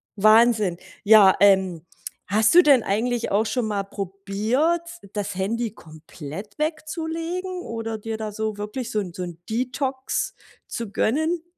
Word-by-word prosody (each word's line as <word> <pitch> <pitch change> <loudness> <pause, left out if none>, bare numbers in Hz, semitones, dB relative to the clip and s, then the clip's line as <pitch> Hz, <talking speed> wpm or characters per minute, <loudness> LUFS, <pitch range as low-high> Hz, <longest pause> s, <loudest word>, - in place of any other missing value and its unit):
Wahnsinn. 215 -3 +4 0.3
Ja, 205 -2 +7
ähm, 190 -4 +3 0.4
hast 215 - +3
du 355 - +10
denn 275 -7 +5
eigentlich 235 +4 -1
auch 215 +3 +2
schon 230 +2 -1
mal 205 -2 -1
probiert, 205 - -1 0.3
das 205 -2 -3
Handy 220 +4 -2
komplett 160 +2 -10
wegzulegen 330 +4 -3
oder 225 -3 -5
dir 220 +1 -5
da 215 -1 -4
so 215 0 -3
wirklich 210 +4 -5
so 215 - 0
'n 180 -4 -5
so 180 - -4
'n 170 -2 -8
Detox 260 +3 -2 0.3
zu 230 -4 -5
gönnen? 315 - 0
220 Hz, 140 wpm, -23 LUFS, 200-255 Hz, 0.4 s, du